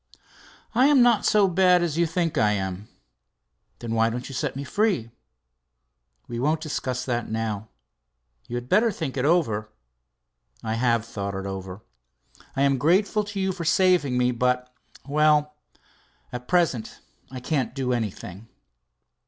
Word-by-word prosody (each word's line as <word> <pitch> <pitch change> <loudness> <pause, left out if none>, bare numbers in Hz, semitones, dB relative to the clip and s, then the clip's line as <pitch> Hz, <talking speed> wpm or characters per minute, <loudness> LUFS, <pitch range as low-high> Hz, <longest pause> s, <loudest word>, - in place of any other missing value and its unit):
"I 255 +4 +5
am 285 -4 +6
not 240 -4 +3
so 205 -2 +4
bad 180 -1 +4
as 165 -4 -1
you 170 0 +2
think 165 0 -1
I 105 -1 +3
am." 95 0 -4 0.9
"Then 115 -1 -5
why 115 0 +3
don't 125 +2 -5
you 135 - -8
set 135 0 -2
me 140 - -4
free?" 180 - 0 1.2
"We 120 -1 -5
won't 150 +5 +1
discuss 130 -5 -3
that, 120 -2 -2
now. 110 -1 -3 0.8
You 120 - -5
had 120 0 -4
better 220 - +3
think 160 -8 -5
it 130 0 -1
over." 115 -11 +1 0.9
"I 110 -1 -2
have 115 -1 +1
thought 100 -4 -5
it 95 0 -5
over. 95 +1 -6 0.7
I 135 - +1
am 135 -2 +2
grateful 195 - +2
to 205 -1 -5
you 190 0 0
for 180 -2 -5
saving 165 -6 +3
me, 125 0 +2
but 125 +1 -1 0.3
well 150 +1 +3 0.8
at 125 0 -6
present 170 -11 0 0.3
I 130 - -7
can't 130 -1 -2
do 130 -2 -1
anything." 105 -2 -5
130 Hz, 155 wpm, -25 LUFS, 115-170 Hz, 1.2 s, am